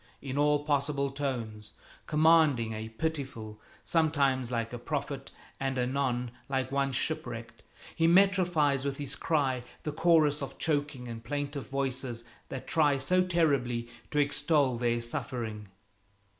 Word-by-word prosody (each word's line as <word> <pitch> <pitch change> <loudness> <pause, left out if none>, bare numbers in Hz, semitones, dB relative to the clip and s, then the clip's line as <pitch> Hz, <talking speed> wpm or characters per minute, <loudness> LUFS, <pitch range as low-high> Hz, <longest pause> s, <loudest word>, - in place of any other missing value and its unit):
in 135 -1 -5
all 145 0 +3
possible 140 -1 0
tones, 120 -7 -4 0.3
commanding 150 -7 +4
a 110 +1 -5
pitiful, 115 -5 -4 0.2
sometimes 140 -6 +2
like 115 -1 -2
a 120 - -4
prophet 140 0 -4 0.3
and 135 -1 -1
anon 125 -1 0 0.2
like 130 -1 -1
one 140 0 +1
shipwrecked; 120 -5 -3 0.3
he 165 -1 +3
metrifies 175 -7 +4
with 140 -1 -2
his 145 -2 -2
cry 135 -6 0 0.2
the 150 - -2
chorus 155 -2 +3
of 135 -1 -6
choking 145 -5 -1
and 115 -1 -7
plaintive 145 +2 -3
voices 130 -3 -3 0.3
that 135 - -6
try 145 -3 +3
so 180 +8 +2
terribly 140 -10 +1 0.2
to 150 - -3
extol 145 -2 +2
their 120 0 +1
suffering. 120 -4 -4
135 Hz, 130 wpm, -30 LUFS, 120-150 Hz, 0.3 s, commanding